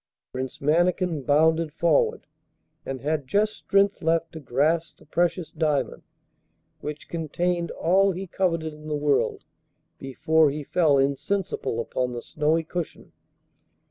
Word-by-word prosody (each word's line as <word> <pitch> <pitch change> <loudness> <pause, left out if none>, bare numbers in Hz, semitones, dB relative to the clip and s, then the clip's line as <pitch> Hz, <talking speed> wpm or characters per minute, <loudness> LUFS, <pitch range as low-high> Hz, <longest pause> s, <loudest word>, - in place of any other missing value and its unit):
Prince 130 0 -5
Mannikin 170 +2 +1
bounded 160 +3 +3
forward, 165 -1 +1 0.6
and 135 -1 -4
had 150 -2 -1
just 210 +6 +2
strength 200 0 +1
left 165 0 +1
to 160 - -8
grasp 155 +5 0
the - - -20
precious 175 +2 0
diamond 150 -6 -1 0.8
which 150 0 -7
contained 170 +1 -1
all 195 +4 +2
he 190 +2 -5
coveted 165 -4 -1
in 150 0 -12
the 150 - -1
world 145 -1 0 0.5
before 155 +3 +2
he 150 +2 -4
fell 150 -1 +3
insensible 140 - -1
upon 125 +1 -2
the 120 - -5
snowy 155 +2 0
cushion. 170 0 -6
160 Hz, 130 wpm, -25 LUFS, 145-170 Hz, 0.8 s, bounded